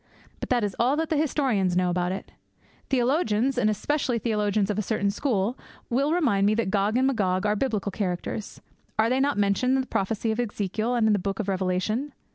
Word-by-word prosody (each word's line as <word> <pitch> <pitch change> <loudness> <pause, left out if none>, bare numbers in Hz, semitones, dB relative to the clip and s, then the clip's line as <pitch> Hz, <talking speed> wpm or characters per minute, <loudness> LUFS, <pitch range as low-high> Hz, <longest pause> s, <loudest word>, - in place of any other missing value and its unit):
But - - -5
that 245 -3 +2
is 205 -2 -2
all 250 +4 +3
that 320 +1 -2
the - - +3
historians 255 - +1
know 180 -1 +2
about 180 0 0
it! 190 - -6 0.6
Theologians, 255 -2 +1
and 235 -4 +2
especially 255 +3 0
theologians 210 -2 0
of 210 - -2
a - - +2
certain 200 -1 0
school, 225 0 -1 0.3
will 275 +5 +2
remind 235 - +2
me 215 - +3
that 225 -4 -1
Gog 205 +3 +1
and 260 - +3
Magog 195 -7 +1
are 210 0 +2
biblical 210 -4 -1
characters. 190 +1 -4 0.4
Are 220 +2 +3
they 260 - +2
not 280 -1 +1
mentioned 205 +6 +2
in 265 - +2
the - - -5
prophecy 220 +1 -1
of 220 - -3
Ezekiel 215 +1 -1
and 235 -2 +2
in 215 - +4
the 205 - +2
Book 195 +2 -3
of 210 - -2
Revelation? 195 +8 -1
215 Hz, 210 wpm, -26 LUFS, 200-255 Hz, 0.6 s, in